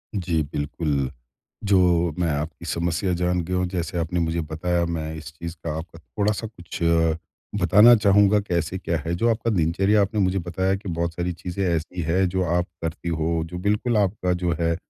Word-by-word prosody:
जी 85 -4 0
बिल्कुल, 75 -2 -1 0.5
जो 90 -5 +3
मैं 85 -2 +1
आपकी 80 +4 -4
समस्या 85 +2 -1
जान 90 0 +1
गया 90 +2 -3
हूँ 90 - +1
जैसे 85 -1 -3
आपने 85 +1 -1
मुझे 85 0 0
बताया, 85 +3 -1
मैं 80 -2 -3
इस 80 +1 -8
चीज़ 85 +2 -7
का 80 -2 -3
आप 80 - -5
थोड़ा-सा 105 +6 -2
कुछ 90 -6 -9 0.8
बताना 105 +6 +7
चाहूँगा, 100 -1 +4
कैसे 90 -3 -2
क्या 85 -2 -1
है। 85 - -1
जो 115 +7 +2
आपका 115 0 0
दिनचर्या 95 +3 +2
आपने 100 +2 0
मुझे 95 0 +1
बताया 95 +2 0
कि 100 0 -7
बहुत 85 0 -2
सारी 90 +1 -2
चीज़ें 90 +3 -4
ऐसी 85 +2 -2
है 85 +4 +2
जो 95 +1 0
आप 85 0 +1 0.2
करती 80 +1 -3
हो, 80 0 0
जो 90 +2 -7
बिल्कुल 105 +5 +1
आपका 95 -2 +1
जो 90 -1 -1
है 85 0 +1
90 Hz, 185 wpm, -24 LUFS, 85-95 Hz, 0.8 s, बताना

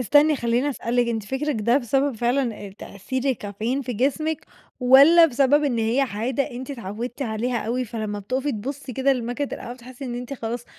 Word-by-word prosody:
استني 290 +5 +4
خلّيني 240 +4 +1
اسألِك 245 -2 0
أنتِ 225 -2 -1
فكرِك 265 +6 -2
ده 235 +6 +3
بسبب 270 +1 0
فعلًا 240 0 0
آآ، - - -9
تأثير 255 +7 -5
الكافيين 235 +1 -2
في 250 - -4
جسمِك 290 +7 -1 0.3
والَّا 280 +7 +8
بسبب 285 +2 +3
إن 245 -5 0
هي 225 +4 +1
عادة، 255 +3 -1
أنتِ 250 +3 -7
اتعودتِ 235 +2 -5
عليها 235 +1 -1
أوي 250 +3 -1
فلمّا 215 -3 -4
بتُقفي 260 +8 -2
تبُصّي 260 +4 -5
كده 265 +3 +2
لماكينة 250 +3 -2
القهوة 240 - -6
بتحسّي 255 +2 -11
إن 240 -1 -4
أنتِ 245 +2 -6
خلاص 235 -1 -4
250 Hz, 180 wpm, -23 LUFS, 230-275 Hz, 0.3 s, والَّا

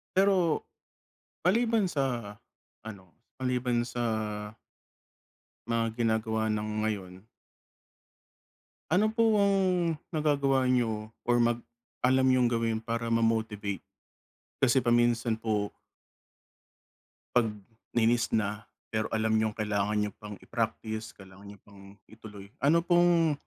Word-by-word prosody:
Pero, 190 -4 +3 0.9
maliban 225 +1 +3
sa, 125 - -2 0.5
ano, 95 -5 -11 0.2
maliban 125 -2 0
sa 120 -1 -3 1.6
mga 115 -1 -1
ginagawa 110 -1 0
ng 105 0 -2
ngayon 95 -3 -4 1.7
ano 195 +6 +4
po 225 -2 +3
ang 200 0 +3 0.6
nagagawa 140 -4 +2
niyo 115 -4 0 0.2
or 120 0 +2
mag 120 0 +2 0.4
alam 130 +1 +4
niyong 125 -2 +3
gawin 115 -1 0
para 115 0 -2
ma-motivate? 110 -4 0 0.8
Kasi 130 0 +3
pa 120 - 0
minsan 120 -1 +2
po 105 -2 -1 1.7
'pag 120 -3 +4 0.5
nainis 120 +1 +3
na, 105 -1 -1 0.3
pero 110 0 -1
alam 110 0 0
niyong 110 -1 +1
kailangan 105 -1 0
niyo 105 -1 -1
pang 105 -1 -8
i-practice 110 -1 -4
kailangan 95 0 -14
niyo 100 - -11
pang 100 0 -15
ituloy, 105 -3 -12 0.2
ano 165 +4 +3
pong 175 -3 +4
115 Hz, 105 wpm, -29 LUFS, 110-130 Hz, 1.7 s, ano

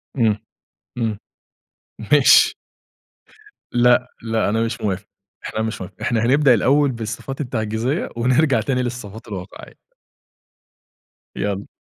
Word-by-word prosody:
امم، 110 -4 +2 0.6
امم. 110 -3 -1 0.9
ماشي. 145 -3 +6 1.2
لأ، 125 +1 +3
لأ، 110 -2 0
أنا 110 +2 0
مش 115 0 -2
موافق، 100 -1 -2 0.4
إحنا 110 - -3
مش 110 -1 -3
موافق 95 0 -8
إحنا 115 -1 0
هَنبدأ 135 +1 +5
الأول 140 +5 +3
بالصفات 115 +4 -5
التعجيزية، 120 - -2
ونرجَع 130 +1 +3
تاني 125 +2 -1
للصفات 115 -3 -6
الواقعية. 95 -4 -9 1.6
يالّا. 100 0 -3
115 Hz, 105 wpm, -21 LUFS, 110-125 Hz, 1.6 s, ماشي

